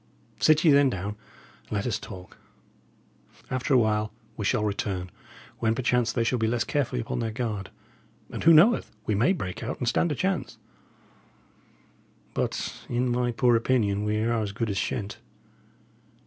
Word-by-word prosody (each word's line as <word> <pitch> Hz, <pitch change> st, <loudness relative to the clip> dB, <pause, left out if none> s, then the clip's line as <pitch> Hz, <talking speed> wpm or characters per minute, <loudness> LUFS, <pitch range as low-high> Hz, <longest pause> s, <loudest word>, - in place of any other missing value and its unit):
Sit 155 Hz, 0 st, +4 dB
ye 160 Hz, -, +6 dB
then 140 Hz, -1 st, +5 dB
down, 100 Hz, -3 st, -3 dB
and 105 Hz, +1 st, -15 dB
let 100 Hz, -1 st, -1 dB
us 120 Hz, -, -1 dB
talk. 90 Hz, -3 st, -10 dB, 1.1 s
After 130 Hz, +1 st, +1 dB
a -, -, +7 dB
while 110 Hz, -2 st, +1 dB, 0.2 s
we 105 Hz, -, -4 dB
shall 110 Hz, 0 st, +1 dB
return, 95 Hz, -3 st, -2 dB, 0.5 s
when 110 Hz, 0 st, +1 dB
perchance 120 Hz, -1 st, +1 dB
they 115 Hz, +1 st, 0 dB
shall 120 Hz, +2 st, 0 dB
be 110 Hz, -, +1 dB
less 115 Hz, 0 st, +1 dB
carefully 130 Hz, -3 st, -1 dB
upon 120 Hz, -, -3 dB
their 115 Hz, -1 st, -1 dB
guard; 110 Hz, -3 st, -3 dB, 0.6 s
and, -, -, -5 dB
who 165 Hz, -, +7 dB
knoweth? 175 Hz, +10 st, +5 dB, 0.2 s
we 110 Hz, -, 0 dB
may 115 Hz, -, +3 dB
break 95 Hz, -, -3 dB
out 120 Hz, +3 st, -4 dB
and 125 Hz, -, -3 dB
stand 165 Hz, +7 st, +2 dB
a -, -, 0 dB
chance. 170 Hz, -9 st, -2 dB, 1.8 s
But, -, -, -3 dB
in 120 Hz, +1 st, 0 dB
my 120 Hz, 0 st, +1 dB
poor 120 Hz, +1 st, +3 dB
opinion, 110 Hz, -4 st, +1 dB
we 105 Hz, 0 st, 0 dB
are 115 Hz, 0 st, +1 dB
as 100 Hz, -2 st, -3 dB
good 110 Hz, 0 st, -2 dB
as 95 Hz, -, -3 dB
shent." 105 Hz, -3 st, -3 dB
115 Hz, 170 wpm, -26 LUFS, 105-125 Hz, 1.8 s, a